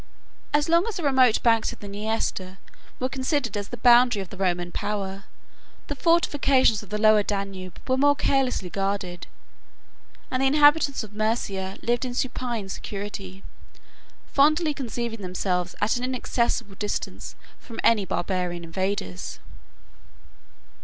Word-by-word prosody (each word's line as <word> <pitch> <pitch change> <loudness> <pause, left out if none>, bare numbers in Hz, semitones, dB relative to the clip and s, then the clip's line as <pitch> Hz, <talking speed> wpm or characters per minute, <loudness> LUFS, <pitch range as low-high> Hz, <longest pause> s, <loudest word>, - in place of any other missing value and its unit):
As 295 0 +2
long 335 +5 +3
as 450 - -3
the 350 - -4
remote 260 -5 +4
banks 225 -2 +3
of - - -10
the 205 - -9
Niester 200 -2 -3 0.4
were 255 - 0
considered 260 -3 -1
as 205 -1 -3
the 245 - -7
boundary 245 -1 +5
of 190 - -6
the - - -8
Roman 175 -2 -1
power, 195 -1 -4 0.6
the 290 - -2
fortifications 280 -8 +3
of 205 - -14
the 210 - -2
Lower 215 0 +5
Danube 195 -3 -4
were 260 0 +2
more 285 +1 +5
carelessly 255 -11 0
guarded, 195 -2 -3 1.0
and 255 - 0
the 270 - +4
inhabitants 290 -1 +4
of 215 - -10
Mæsia 205 -3 -2
lived 240 +1 +1
in 250 -1 -4
supine 240 -5 -2
security, 195 -1 -6 0.8
fondly 305 +2 +3
conceiving 235 -4 -4
themselves 180 -1 -2
at 215 +4 +2
an 245 - -4
inaccessible 235 -4 -1
distance 205 +1 -4 0.2
from 230 - -11
any 220 -3 +4
barbarian 175 -1 -2
invaders. 170 - -3
215 Hz, 140 wpm, -25 LUFS, 195-260 Hz, 1.0 s, boundary